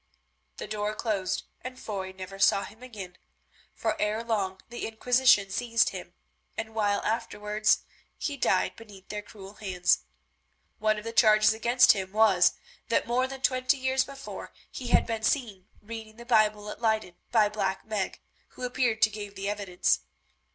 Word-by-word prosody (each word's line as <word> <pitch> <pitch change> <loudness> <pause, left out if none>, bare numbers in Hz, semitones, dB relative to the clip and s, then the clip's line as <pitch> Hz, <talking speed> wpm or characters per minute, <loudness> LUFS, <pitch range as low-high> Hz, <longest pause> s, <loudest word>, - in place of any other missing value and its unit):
The - - -5
door 210 0 -2
closed 195 -5 -1 0.2
and 255 0 -7
Foy 190 -3 -5
never 190 +1 -9
saw 195 0 +4
him 220 - -12
again, 200 -8 -9 0.6
for - - -1
ere 215 +2 0
long 200 -5 -1
the 240 - -4
Inquisition 225 -3 +3
seized 230 +2 +2
him - - -9 0.4
and 225 0 -3
a - - -19
while 205 -2 +1
afterwards 210 -1 0 0.3
he 290 - -3
died 215 -8 +1
beneath 205 -4 -14
their 210 0 -4
cruel 200 -1 -12
hands. 180 -3 +2 0.8
One 215 0 +2
of 210 - -6
the 230 0 -5
charges 215 -1 +6
against 240 +3 +5
him 190 -2 -2
was, 210 -5 +5 0.4
that 230 - +2
more 250 +2 +1
than 265 0 -8
twenty 255 +2 +2
years 260 0 +1
before, 275 -1 -9 0.2
he 255 - -6
had - - +4
been 225 -2 -3
seen 220 -7 -1 0.2
reading 220 0 -8
the 235 +1 -11
Bible 210 -3 +2
at - - -10
Leyden 220 -5 +1 0.2
by 220 -3 +5
Black 195 -2 -2
Meg, 215 -3 -3 0.4
who - - -7
appeared 245 -3 +2
and 220 - -7
gave 205 -1 -7
the 195 +1 -4
evidence. 200 -3 +1
215 Hz, 165 wpm, -28 LUFS, 200-235 Hz, 0.8 s, charges